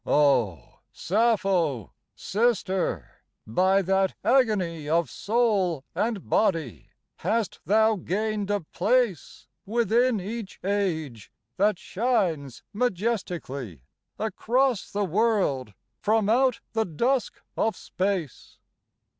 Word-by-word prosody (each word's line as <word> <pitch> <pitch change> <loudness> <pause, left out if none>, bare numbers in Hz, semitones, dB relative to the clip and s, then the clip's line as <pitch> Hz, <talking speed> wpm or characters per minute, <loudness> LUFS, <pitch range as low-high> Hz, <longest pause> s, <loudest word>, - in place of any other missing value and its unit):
Oh! 125 - +1
Sappho, 190 - +1 0.2
sister, 200 -4 0 0.3
by 185 - +2
that 190 +1 +1
agony 195 - +1
Of 170 +1 +1
soul 200 - +1
and 220 -4 -2
body 165 - 0 0.3
hast 225 -2 -1
thou 220 +1 +4
gained 205 +3 -2
a 205 -1 0
place 215 - 0 0.2
Within 235 +2 +2
each 210 +2 -6
age 160 - -2 0.3
that 205 0 +3
shines 185 - -1
majestic'ly 180 - -2 0.4
Across 240 +2 0
the 205 0 0
world 185 - 0 0.2
from 215 -1 +1
out 255 +2 +3
the 225 -1 +1
dusk 240 - -1 0.2
of 225 - 0
space. 185 -7 -3
200 Hz, 95 wpm, -26 LUFS, 165-225 Hz, 0.4 s, thou